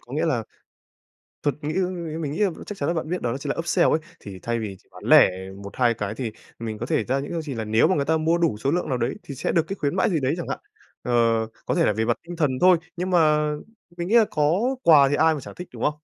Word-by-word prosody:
có - - -15
nghĩa - - 0
là - - 0 1.0
thuật 145 - +1
nghĩ 150 +2 -2 0.5
mình 150 -3 -3
nghĩ 165 - 0 0.2
chắc 205 - -7
chắn - - -2
là - - +1
bạn 160 -1 -3
biết, 180 - -2
đó 120 +1 -1
chính 145 - -5
là - - -3
upsell 165 - +2
ấy. 155 - +2 0.2
Thì 95 -2 -9
thay 115 0 -1
vì 105 -3 -5
chỉ - - -31
bán - - -13
lẻ - - +7 0.3
1-2 120 +4 +1
cái 105 -1 -4
thì 115 -3 -3 0.3
mình 110 -2 -4
có 115 - -4
thể - - 0
ra 130 +2 0
những 140 - -6
cái 170 - -2
gì 150 -4 -5
là 115 - -3
nếu 110 +6 +3
mà 185 - +2
người 140 - 0
ta 160 +1 +2
mua 160 +2 +2
đủ 165 -11 +1
số 135 +6 -1
lượng 175 -1 -1
nào 130 - 0
đấy, 120 +2 -1
thì 140 - -8
sẽ - - -1
được 165 - +3
cái 195 - -3
khuyến 150 -1 -2
mãi 190 - +2
gì 165 - +1
đấy 130 0 0
chẳng 175 - -5
hạn. - - -3 0.4
Ờ, 125 - -3 0.5
có - - 0
thể - - +3
là - - +2
về 110 +2 0
mặt 120 0 +1
tinh 175 - -6
thần 150 -5 +1
thôi, 180 -1 +7 0.2
nhưng 180 +2 -2
mà 155 -3 +3 0.5
mình 170 0 -3
nghĩ 220 - +2
là 230 -2 +7
có 175 - +1
quà 145 -4 +7
thì 145 - +1
ai 160 +2 +4
mà 150 - -4
chẳng - - -10
thích, 180 - -8
đúng - - -6
không? 150 - +2
150 Hz, 290 wpm, -24 LUFS, 120-170 Hz, 1.0 s, lẻ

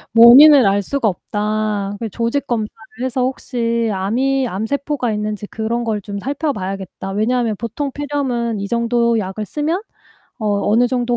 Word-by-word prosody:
"원인을 260 +4 +9
알 200 +1 +2
수가 270 +1 -1
없다. 210 +1 -2
그 225 -2 -4
조직 235 +7 -2
검사를 220 -3 -2 0.3
해서 260 0 -1
혹시 235 -3 -1
암이 255 +8 0
암세포가 245 +5 -2
있는지 210 0 -3
그런 230 +3 -2
걸 220 -3 -2
좀 200 0 -6
살펴봐야겠다. 195 - -4
왜냐하면 225 +2 0
보통 250 +6 -4
폐렴은 255 -6 -2
이 200 - -4
정도 235 0 +1
약을 200 +2 -4
쓰면 315 - -2 0.6
어 215 - -3 0.2
어느 230 +4 +4
정도 245 -1 0
235 Hz, 310 characters per minute, -18 LUFS, 210-260 Hz, 0.6 s, 원인을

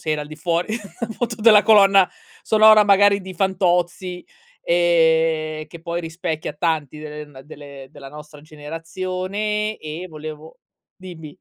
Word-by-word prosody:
se 155 - -4
era 150 - -2
al 150 - -9
di 155 - -10
fuori 170 +6 -2 0.3
appunto 230 0 -4
della 215 -2 +7
colonna 195 -3 +5 0.3
sonora 215 -1 +6
magari 200 0 +4
di 185 0 -10
Fantozzi, 180 -1 -1 0.4
ehm, 160 -2 +1
che 170 - -13
poi 170 0 -4
rispecchia 160 -2 -5
tanti 155 -2 -2
de 150 0 -8
ehm, 145 -3 -13
delle 140 -2 -12
della 135 - -12
nostra 150 +1 -13
generazione, 185 +8 -4
e 155 +4 -7
volevo 155 0 -10 0.4
dimmi? 170 -5 -11
170 Hz, 135 wpm, -20 LUFS, 155-190 Hz, 0.4 s, della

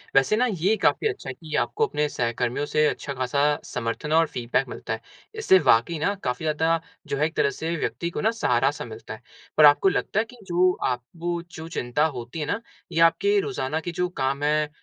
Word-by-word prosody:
वैसे 135 +9 +4
ना 250 - +3
ये 190 +3 +1
काफ़ी 445 - +2
अच्छा 405 - -5
है - - -4
कि 155 +2 -11
आपको 445 +1 0
अपने 150 - 0
सहकर्मियों 120 +2 -1
से 150 +1 +2
अच्छा-खासा 140 0 -1 0.2
समर्थन 120 +5 -4
और 165 0 +5
फ़ीडबैक 120 -4 -1
मिलता - - -5
है। - - -5 0.4
इससे 190 - +5
वाक़ई 145 +2 +3
ना 200 +6 +1
काफ़ी 125 +5 -2
ज़्यादा 160 +2 +2 0.3
जो 140 -1 -2
है 150 - +2
एक 160 - -4
तरह 140 - +3
से 165 +4 -3
व्यक्ति 170 +1 -2
को - - -4
ना 220 - +3
सहारा-सा 135 - +1
मिलता 110 -1 -9
है। 110 - -11 0.4
पर 155 - +8
आपको 145 +6 +6
लगता 200 - -1
है 220 - +1
कि 245 +2 -16
जो 180 +1 +3 0.2
आपको 165 +8 -3
जो 160 -1 -8
चिंता 135 0 0
होती 120 +6 -6
है 150 - -1
ना, 205 - -1 0.3
ये 165 - -1
आपके 200 +5 +4
रोज़ाना 140 -4 -2
के 175 +2 -5
जो 180 +2 -1
काम 140 +2 0
हैं, 150 0 +2
155 Hz, 210 wpm, -25 LUFS, 130-170 Hz, 0.4 s, पर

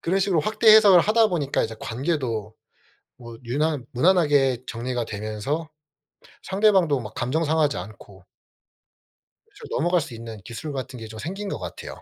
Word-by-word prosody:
그런 185 +3 +1
식으로 190 -4 +2
확대 215 +5 +3
해석을 200 -5 +7
하다 220 +3 +3
보니까 150 -7 -1
이제 110 0 -3
관계도 120 - -3 0.6
뭐 120 -2 -11
유난 145 +1 -1
무난하게 145 -4 +3
정리가 120 0 -3
되면서 110 +10 -4 0.7
상대방도 190 -8 +2
막 110 - -9
감정 140 +7 -1
상하지 155 -2 +1
않고 100 -3 -11 1.3
대충 - - -13
넘어갈 175 +1 +1
수 145 -5 -8
있는 115 -2 -9
기술 140 +8 -7
같은 130 -2 -6
게 110 - -8
좀 110 0 -10
생긴 195 - -5
것 - - -3
같아요. - - -8
140 Hz, 325 characters per minute, -24 LUFS, 115-175 Hz, 1.3 s, 해석을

